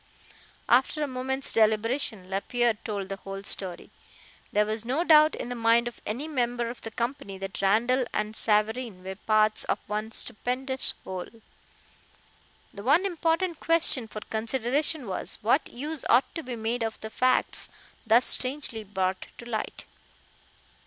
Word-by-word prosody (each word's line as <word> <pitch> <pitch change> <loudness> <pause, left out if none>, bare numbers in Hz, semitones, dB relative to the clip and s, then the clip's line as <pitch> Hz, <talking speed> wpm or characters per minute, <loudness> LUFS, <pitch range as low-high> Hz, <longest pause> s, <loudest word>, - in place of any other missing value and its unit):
After 265 +5 +3
a - - -1
moment's 265 +1 -1
deliberation, 220 -1 +2
Lapierre 235 +5 +1
told 205 -2 -5
the 195 - -5
whole 195 0 -7
story. 185 -3 0 0.6
There 210 +1 +3
was 215 +1 -2
no 265 +8 0
doubt 310 -2 +6
in - - -5
the - - -2
mind 230 0 +3
of 240 - -8
any 250 +9 -3
member 240 -5 -1
of 245 - -12
the 225 - -5
company 235 -3 -4
that 195 +1 -5
Randall 240 +6 +3
and 210 +1 -2
Savareen 215 -2 +1
were 190 +1 -5
"parts 215 +2 +2
of - - 0
one 215 +1 -3
stupendous 260 +4 -3
whole." 185 -1 -5 1.5
The 200 - -8
one 300 - +4
important 335 -1 0
question 325 -7 +2
for 215 0 -7
consideration 255 +7 -1
was: 190 -3 -2
What 245 +7 +2
use 295 +4 -3
ought 250 +3 +4
to 330 - -4
be 255 -5 -6
made 230 +2 -2
of 225 -1 -2
the 220 - -6
facts 255 +2 +1 0.3
thus 230 +2 +4
strangely 255 -4 +1
brought 190 -2 -2
to 235 - -10
light? 220 -2 -4
235 Hz, 150 wpm, -27 LUFS, 215-265 Hz, 1.5 s, doubt